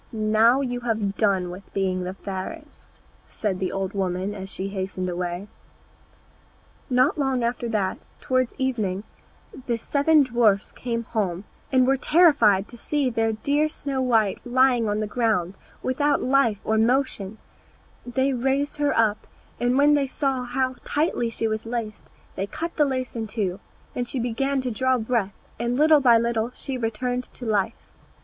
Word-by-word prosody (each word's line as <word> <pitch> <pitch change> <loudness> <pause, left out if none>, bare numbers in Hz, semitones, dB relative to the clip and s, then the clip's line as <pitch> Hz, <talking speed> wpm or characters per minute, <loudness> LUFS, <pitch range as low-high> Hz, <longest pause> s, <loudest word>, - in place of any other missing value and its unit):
"Now 220 +4 +3
you 245 -2 -2
have 220 -4 -1
done 190 -5 +1
with 185 +2 -11
being 185 -2 0
the 185 +1 -5
fairest," 200 - -8 0.3
said 195 -4 -2
the 185 - -1
old 195 0 -3
woman 190 0 -2
as 190 -1 -7
she 195 +1 -3
hastened 190 -1 -3
away. 175 +2 -3 1.4
Not 255 +4 +3
long 265 -3 +1
after 235 0 -1
that, 200 -4 -1 0.2
towards 255 -1 0
evening, 215 -8 -1 0.6
the 235 -2 +1
seven 290 +5 +3
dwarfs 230 -6 +2
came 235 -2 -3
home, 195 -5 -2 0.3
and 255 -1 +4
were 270 +1 +3
terrified 265 - +4
to 240 - -12
see 285 -2 0
their 225 -1 +1
dear 290 +7 +1
Snow 280 -3 -3
white 225 -6 +2
lying 245 -2 +3
on 210 +1 0
the - - 0
ground, 210 -5 0 0.3
without 285 +3 +1
life 255 -6 +2
or 220 0 +1
motion; 225 -4 0 0.7
they 260 +2 0
raised 270 +4 0
her 290 -1 +1
up, 215 -2 +1 0.3
and 245 +2 +2
when 290 +1 +5
they 285 -2 +2
saw 265 -2 -1
how 255 +1 -1
tightly 290 -6 0
she 225 0 -2
was 220 0 -2
laced 230 -3 -5 0.3
they 195 - -2
cut 335 +9 -4
the 300 - +4
lace 255 -3 -3
in 225 -1 -3
two; 200 -4 -2 0.3
then 245 - -2
she 260 - -4
began 265 +4 0
to 255 -1 -3
draw 260 +3 +1
breath, 220 -4 -1 0.2
and 240 +1 -1
little 305 0 +5
by 240 -3 +6
little 230 0 0
she 270 - -5
returned 245 +1 -2
to 245 - -11
life. 215 0 -1
235 Hz, 165 wpm, -24 LUFS, 205-260 Hz, 1.4 s, by